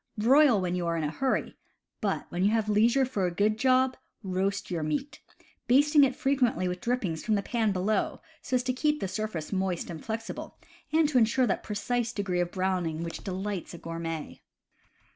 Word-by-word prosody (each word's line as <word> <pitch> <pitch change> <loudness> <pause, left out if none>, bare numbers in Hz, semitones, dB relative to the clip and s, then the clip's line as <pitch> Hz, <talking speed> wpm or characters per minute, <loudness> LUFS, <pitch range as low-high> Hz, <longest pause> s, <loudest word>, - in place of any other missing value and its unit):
Broil 255 +1 +5
when 180 -1 -1
you 180 -1 -1
are 170 0 0
in 160 - -1
a 150 - -1
hurry; 265 +10 -1 0.5
but, - - -1
when 175 +1 -2
you 200 - +5
have 220 -1 +1
leisure 230 +6 +4
for 205 -8 -1
a - - -2
good 210 +4 +1
job, 260 0 +3 0.3
roast 195 +1 -2
your 170 -2 -1
meat, 155 - -3 0.5
basting 290 +4 +5
it 265 -2 +2
frequently 260 -9 +1
with 180 0 -4
drippings 205 -10 -1
from 215 - +1
the 200 - -1
pan 225 -2 0
below, 195 +3 0 0.2
so 260 - -2
as 250 - +1
to 255 0 0
keep 300 +3 +1
the 195 - -2
surface 200 -5 -4
moist 190 -3 -1
and 160 - -8
flexible, 225 0 -5 0.3
and 310 -1 +3
insure 250 0 +3
that 205 - 0
precise 230 +3 -2
degree 190 -4 -1
of 175 -1 0
browning 180 -4 -1
which 165 -1 -6
delights 190 -2 -4
a - - -8
gourmet. 165 -1 -5
210 Hz, 190 wpm, -28 LUFS, 180-250 Hz, 0.5 s, Broil